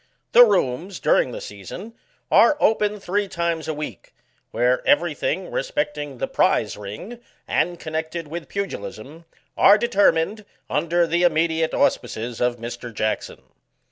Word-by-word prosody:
The 245 - +9
rooms, 185 - 0
during 125 - +2
the - - -6
season, 105 - -9 0.4
are 300 - +6
open 210 -1 +2
three 200 +2 -1
times 170 -3 -2
a 160 - -1
week, 145 - -8 0.3
where 125 +1 +1
every 290 +2 +3
thing - - -3
respecting 150 - -3
the - - -2
prize - - +1
ring, 105 - -8 0.3
and 175 0 0
connected 160 +1 -4
with 165 +2 -7
pugilism, 155 - -6 0.3
are 205 - +7
determined, 205 -2 +2 0.2
under 170 +1 +1
the 170 +1 0
immediate 160 -1 +2
auspices 115 +1 -1
of 125 0 +1
Mr. 120 +1 -7
Jackson. 110 0 -3
165 Hz, 135 wpm, -22 LUFS, 125-200 Hz, 0.4 s, The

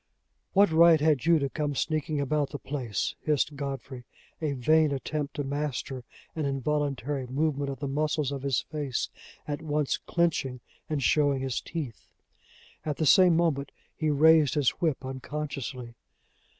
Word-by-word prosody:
"What 200 -2 +5
right 165 0 +6
had 150 -2 +2
you 170 -1 +6
to 140 -2 0
come 145 +1 -2
sneaking 155 +1 -1
about 145 +1 0
the 145 - -5
place?" 125 -8 -3
hissed 150 -1 0
Godfrey, 135 -2 -5 0.4
a 150 -3 0
vain 155 +4 +3
attempt 140 +1 -3
to 145 - -2
master 140 -2 -3 0.3
an 160 - -2
involuntary 140 -1 -1
movement 140 +1 -1
of 135 +1 -6
the 140 - -2
muscles 150 0 0
of 140 -2 -4
his 140 -2 +1
face 145 -5 -3 0.4
at 145 +1 -3
once 150 -2 0
clinching 150 -7 0 0.3
and 150 -3 -1
showing 145 -2 +3
his 130 -1 -2
teeth. 145 - -6 0.8
At 150 -2 -3
the 160 - 0
same 175 +2 +6
moment 145 -5 0 0.2
he 155 - 0
raised 155 0 +5
his 145 -4 +3
whip 155 -6 0
unconsciously. 130 -2 -5
145 Hz, 150 wpm, -28 LUFS, 135-155 Hz, 0.8 s, right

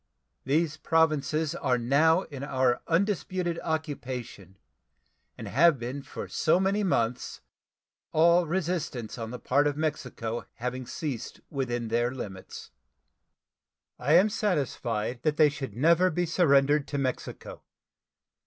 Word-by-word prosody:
These 155 +3 +1
Provinces 155 -1 +1
are 125 - 0
now 155 +9 +3
in 140 -3 -8
our 130 -3 +1
undisputed 180 -1 0
occupation, 130 - -5 0.8
and - - -7
have 165 +2 +4
been 125 +4 -5
so 155 - -1
for - - +3
many 195 +2 +1
months, 120 - -1 0.7
all 170 +2 +4
resistance 165 - -3
on 115 -1 -4
the 125 - -6
part 145 +4 +2
of 145 -1 -2
Mexico 125 -7 -3
having 125 +1 -4
ceased 140 -8 -5
within 120 -5 -2
their 120 +2 +1
limits. 100 -8 -8 1.3
I 140 +5 +1
am 185 +6 +6
satisfied 125 - -1
that 150 +1 0
they 155 -2 +6
should 135 -7 -6
never 170 +7 +4
be 175 +1 -1
surrendered 145 -4 +3
to 145 - -3
Mexico. 130 -2 -4
145 Hz, 125 wpm, -28 LUFS, 125-165 Hz, 1.3 s, am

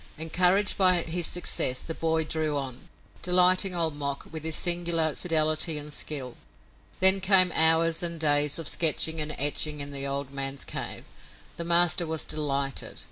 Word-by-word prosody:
Encouraged 180 +6 0
by 185 -3 +3
his 170 0 -3
success, 130 -7 +1
the 165 - -8
boy 160 0 -2
drew 155 -1 -4
on, 130 -2 -8 0.3
delighting 180 +1 +3
Old 165 -3 +1
Mok 140 -1 -5
with 160 -1 -8
his 160 -1 -2
singular 170 -3 +1
fidelity 155 -1 +1
and 150 0 -8
skill. 135 -6 -5 0.6
Then 190 +1 +5
came 185 -2 +4
hours 160 +1 +3
and 170 -1 -4
days 145 -1 +3
of 165 -3 -6
sketching 160 0 +1
and 155 0 -3
etching 150 +1 -1
in 140 0 -7
the 140 0 -4
old 140 0 -6
man's 135 0 -5
cave. - - -6 0.5
The 170 - -6
master 170 0 +3
was 160 -1 -3
delighted. 140 -3 -3
160 Hz, 160 wpm, -24 LUFS, 145-175 Hz, 0.6 s, Then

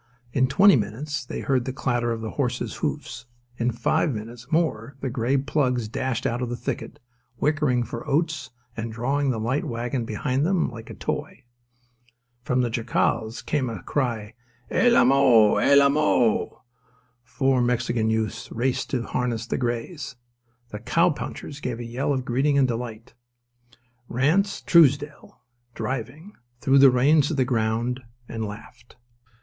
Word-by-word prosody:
In 130 0 +3
twenty 190 +8 +6
minutes 135 +7 -3
they 125 - -6
heard 130 -3 0
the 130 - -2
clatter 120 -2 -1
of 115 -1 -3
the 110 - -4
horses' 125 -3 -2
hoofs: 120 - -4 0.3
in 120 +1 +1
five 125 +7 +1
minutes 115 +2 -9
more 140 -6 0
the 135 -2 -3
grey 125 +2 +1
plugs 130 -4 0
dashed 125 +2 -3
out 120 +2 -1
of 125 - -2
the 120 - -3
thicket, 120 - -5 0.4
whickering 150 -5 +1
for 115 0 -7
oats 155 -2 0 0.3
and 115 0 -4
drawing 135 +5 0
the 120 -4 -1
light 125 +6 -1
wagon 120 +1 -3
behind 125 +5 -1
them 180 -4 +1
like 115 -1 -10
a - - -8
toy. - - -4 1.0
From 125 -1 0
the 120 -2 -1
jacals 115 -1 -1
came 140 -5 0
a 110 -6 -7
cry 125 -6 -1
of: 105 +1 -13 0.4
"El 245 -1 +5
Amo! 125 -4 +5
El 140 0 +5
Amo!" 140 -5 +2 0.6
Four 130 0 +1
Mexican 120 -2 0
youths 110 0 -2
raced 125 +2 -1
to 130 - -1
unharness 120 -1 -2
the - - -2
greys. 125 +5 -3 0.5
The 105 - -7
cowpunchers 150 +2 -1
gave 125 -2 -3
a 120 - -5
yell 125 +5 -2
of 130 -2 -1
greeting 135 +3 +1
and 135 -2 +4
delight. 115 -2 -5 1.0
Ranse 160 - +1
Truesdell, 145 -3 +3 0.4
driving, 135 - -5 0.3
threw 135 +2 +4
the 135 0 +9
reins 140 +4 +4
to 160 - -2
the 130 -2 +2
ground 120 +1 0 0.3
and 115 -1 -4
laughed. 110 +3 -10
125 Hz, 155 wpm, -24 LUFS, 115-140 Hz, 1.0 s, the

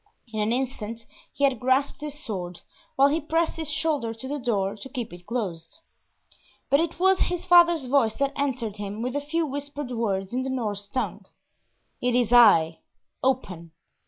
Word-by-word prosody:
In 215 - -2
an 210 +1 +1
instant 235 -3 -3 0.3
he 285 - -4
had 270 -4 +3
grasped 260 +4 +1
his 295 -1 -5
sword, 180 - -5 0.3
while 275 +1 +5
he 315 +3 0
pressed 325 +2 0
his 320 -2 -3
shoulder 295 -7 -1
to 225 +4 -8
the 290 +2 -3
door 205 -6 0
to 240 +6 -9
keep 240 -6 -5
it 175 0 -13
closed; 205 - -4 0.9
but 280 - +5
it 335 +1 -2
was 380 +1 +4
his 355 0 -1
father's 345 -4 +6
voice 250 -4 +2
that 275 0 0
answered 255 -7 -2
him 205 +2 -5
with 250 +2 -3
a 290 - 0
few 325 +3 -1
whispered 285 -1 -5
words 200 -4 -2
in 255 - 0
the 265 - -3
Norse 210 -6 -3
tongue, 255 +5 -3 0.7
"It 245 0 +1
is 245 -1 +2
I, 170 -9 +6 0.4
open." 185 -11 -2
255 Hz, 180 wpm, -25 LUFS, 215-285 Hz, 0.9 s, father's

